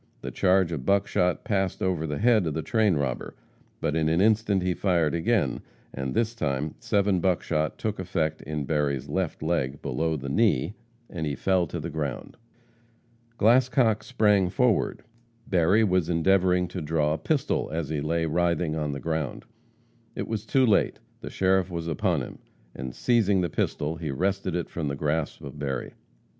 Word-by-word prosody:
The - - -5
charge 95 -2 +2
of 75 -6 -3
buckshot 90 -2 +1
passed 95 -3 -1
over 90 -4 0
the 75 -1 -3
head 110 -4 +3
of 75 - -2
the 80 - -2
train 110 -6 +2
robber, 70 -4 -3 0.4
but 75 - -1
in 80 -1 +2
an 80 +2 +2
instant 105 -2 +3
he 90 0 +1
fired 85 -5 +1
again, 85 - +1 0.3
and 65 -1 -4
this 115 0 +1
time 75 - -2
seven 100 -5 +1
buckshot 85 -4 0
took 110 -3 -3
effect 85 -4 -1
in 75 0 -4
Berry's 70 -3 -1
left - - -2
leg, 65 +2 -1
below 80 +5 -1
the 70 -1 -6
knee, 95 - +2 0.3
and 80 -3 -4
he 70 - -2
fell 95 +3 +1
to 85 - -5
the 80 +2 -5
ground. 75 -3 -4 1.0
Glascock 120 -1 +3
sprang 105 -6 +2
forward. 125 -1 +1 0.4
Berry 95 0 +3
was 90 -5 +1
endeavoring 90 +1 +3
to 90 0 -5
draw 75 -1 +1
a - - -1
pistol, 145 - 0
as 80 -2 -3
he 75 -2 -2
lay 80 +2 0
writhing 85 0 0
on 75 -2 -2
the 70 - -5
ground. 80 -4 -3 0.7
It - - -4
was 110 -1 -4
too 130 +2 +3
late; 105 -4 +2 0.2
the - - -7
sheriff 95 -1 +1
was 85 -2 -4
upon 85 -4 0
him, - - -9 0.4
and, 65 -1 -6
seizing 105 -6 +2
the 85 - -2
pistol, 75 +3 -1
he 80 -1 -4
wrested 95 +5 -1
it 85 - -2
from 80 -3 -4
the 70 - -2
grasp 75 +1 -2
of 70 +1 -9
Berry. 65 -3 -3
85 Hz, 175 wpm, -26 LUFS, 75-100 Hz, 1.0 s, head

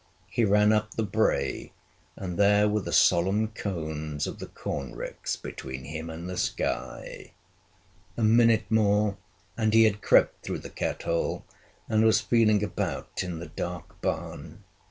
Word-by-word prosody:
He 120 - +1
ran 105 +1 +4
up 105 -1 0
the 110 - 0
brae, 110 +2 0 0.4
and 90 -2 -5
there 105 +1 +5
were 105 0 +1
the - - -5
solemn 100 +5 +3
cones 80 -8 -4
of - - -6
the - - -6
corn 70 -3 -5
ricks - - -4
between 65 -1 -7
him 80 +4 -6
and 80 +2 -7
the 90 -1 -5
sky! 65 0 -3 0.8
A 115 - -1
minute 115 0 +5
more 105 -2 +3 0.4
and 110 -1 +1
he 115 - +8
had 105 -2 +2
crept - - +3
through - - -3
the - - -10
cat - - -3
hole, 85 0 -1 0.4
and 110 0 +2
was 110 0 +5
feeling 110 -3 +3
about 100 -7 -3
in 90 -3 -4
the 80 -1 -8
dark 85 +1 -6
barn. - - -4
100 Hz, 155 wpm, -27 LUFS, 85-110 Hz, 0.8 s, he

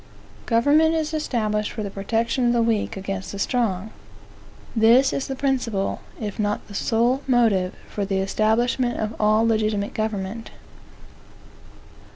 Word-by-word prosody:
Government 290 +8 +4
is 315 -1 -1
established 215 -8 -1
for 215 - -4
the 200 - -5
protection 230 +5 0
of 240 - +3
the 235 - +2
weak 225 -1 0
against 195 0 -5
the - - -5
strong. 215 -2 -1 0.8
This 235 +4 +5
is 270 - -2
the 270 - -3
principal, 250 -8 -1 0.2
if 210 -2 -5
not 210 0 -1
the 205 - -11
sole, 235 +6 +1
motive 220 -8 +2
for 205 - -4
the 195 -1 -1
establishment 225 +5 +1
of 215 0 -2
all 215 +1 +3
legitimate 215 -2 0
government. 215 0 -3
220 Hz, 140 wpm, -23 LUFS, 205-245 Hz, 0.8 s, This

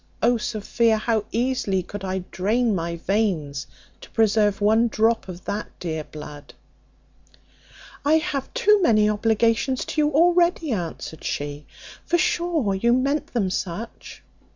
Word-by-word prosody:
O 240 +2 +4
Sophia, 220 +1 0
how 220 -1 0
easily 230 -6 0
could 205 +2 -8
I 190 -1 -2
drain 220 +5 +1
my 170 -2 -2
veins 170 -8 -1 0.3
to - - -12
preserve 210 -2 +2
one 220 +3 +4
drop 225 0 +1
of 180 -1 -9
that 210 +1 -3
dear 160 -3 -3
blood." 150 -1 -11 1.5
"I 295 +2 +4
have 290 -4 -1
too 425 -5 +4
many 215 -10 +4
obligations 225 +4 +1
to 305 - -1
you 295 - +3
already," 340 0 +3
answered 170 -5 -5
she, 145 0 -4 0.4
"for 345 - +1
sure 340 - +1
you 235 +5 +2
meant 275 +4 +1
them 200 -7 -1
such." 190 +5 -6
220 Hz, 135 wpm, -23 LUFS, 185-255 Hz, 1.5 s, O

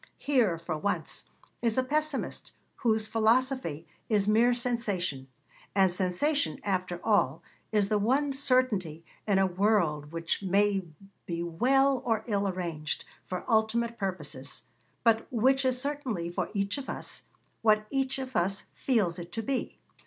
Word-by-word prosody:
Here, 240 -12 +2
for 165 -2 -4
once, 200 +5 -2 0.4
is 230 -1 +1
a 260 - +4
pessimist 300 +1 -2 0.2
whose 220 -3 +2
philosophy 225 - +1 0.2
is 205 -3 +2
mere 235 +3 +4
sensation 205 - -1 0.5
and 190 -2 +4
sensation, 195 - +1
after 185 -3 -1
all, 185 -9 +2 0.3
is 205 -2 +2
the 210 -1 +2
one 270 +7 +2
certainty 245 - +1 0.2
in 200 -2 +3
a 195 - +4
world 175 -6 +1
which 165 +2 -2
may 195 -1 +2 0.4
be 170 -1 -2
well 260 +10 +3
or 225 -2 0
ill 200 -3 0
arranged, 170 -5 -3 0.2
for 180 -1 -5
ultimate 230 +1 +1
purposes, 155 -8 -5 0.4
but 225 +3 +3
which 265 +3 +3
is 255 -1 +1
certainly, 255 -11 -2
for - - -2
each 200 +5 0
of 270 - -7
us, - - -5 0.4
what 215 -1 +4
each 270 -1 0
of 260 -1 -6
us 195 +3 +1
feels 205 -10 +1
it 170 0 -8
to 225 - -3
be. 260 +3 -2
215 Hz, 145 wpm, -29 LUFS, 180-250 Hz, 0.5 s, a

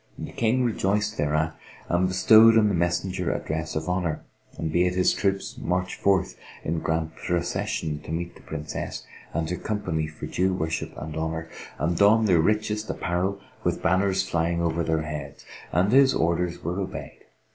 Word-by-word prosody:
The - - -6
King 120 +3 +1
rejoiced 105 -2 0
thereat 75 +2 +1 0.3
and 90 +2 +2
bestowed 110 +4 +7
on 105 -2 +5
the - - 0
messenger 90 +1 0
a - - 0
dress 80 0 -4
of 80 +2 -2
honour; 90 -3 -1 0.3
and 80 -1 -3
bade 90 +1 +2
his 90 0 +3
troops 100 +5 -1
march 90 -6 -1
forth 100 -2 +1 0.3
in 80 +1 -1
grand 80 0 -2
procession 90 -2 -2
to - - -9
meet 85 +2 -3
the - - -16
Princess 75 +1 -5 0.3
and 80 -1 -1
her 90 +2 -2
company 90 -7 -2
for 80 0 -8
due 95 +1 0
worship 80 -2 -2
and 80 +1 -6
honour, 80 0 -3 0.3
and 85 +2 0
don 110 +2 +5
their 90 -5 +4
richest 105 +3 0
apparel 90 +3 -1 0.2
with - - -1
banners 95 +2 +2
flying 85 +1 0
over 85 0 0
their 80 -1 0
heads. 75 -2 -7 0.3
And 90 +5 +2
his 135 +1 +6
orders 85 +1 0
were 90 +4 -2
obeyed. 95 - -6
90 Hz, 170 wpm, -25 LUFS, 80-100 Hz, 0.3 s, bestowed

